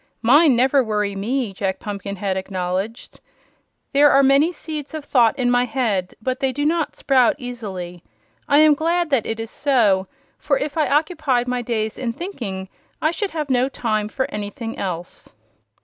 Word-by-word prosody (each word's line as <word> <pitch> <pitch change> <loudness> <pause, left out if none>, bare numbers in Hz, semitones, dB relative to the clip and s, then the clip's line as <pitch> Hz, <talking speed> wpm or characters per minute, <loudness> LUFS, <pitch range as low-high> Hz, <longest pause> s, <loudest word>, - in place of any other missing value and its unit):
"Mine 285 +4 +6
never 265 +3 +3
worry 210 -3 -1
me," 225 +2 -2
Jack 190 -1 -2
Pumpkinhead 200 -1 -4
acknowledged. 190 +3 -4 0.7
"There 290 +1 +6
are 275 0 +5
many 275 +5 +4
seeds 310 -3 -6
of 305 -2 -6
thought 235 -6 +3
in 245 -2 +1
my 245 0 +3
head, 220 -7 -1
but 255 +3 -2
they 265 -1 +1
do 290 +3 -2
not 320 0 0
sprout 260 -4 +3
easily. 195 - -7 0.4
I 285 +1 +5
am 310 -1 +6
glad 335 +2 0
that 260 -6 +2
it 225 0 -3
is 225 0 -5
so, 215 -9 +2 0.3
for - - +1
if 305 - -3
I 310 -2 +1
occupied 295 -5 +1
my 250 0 -1
days 220 -2 -2
in 240 -3 -2
thinking 225 - -5 0.3
I 310 - +1
should 405 +3 -2
have 305 -5 -3
no 255 +1 +2
time 215 -5 -2
for 260 +4 -1
anything 210 +2 -5
else." 175 -2 -6
245 Hz, 170 wpm, -21 LUFS, 210-285 Hz, 0.7 s, Mine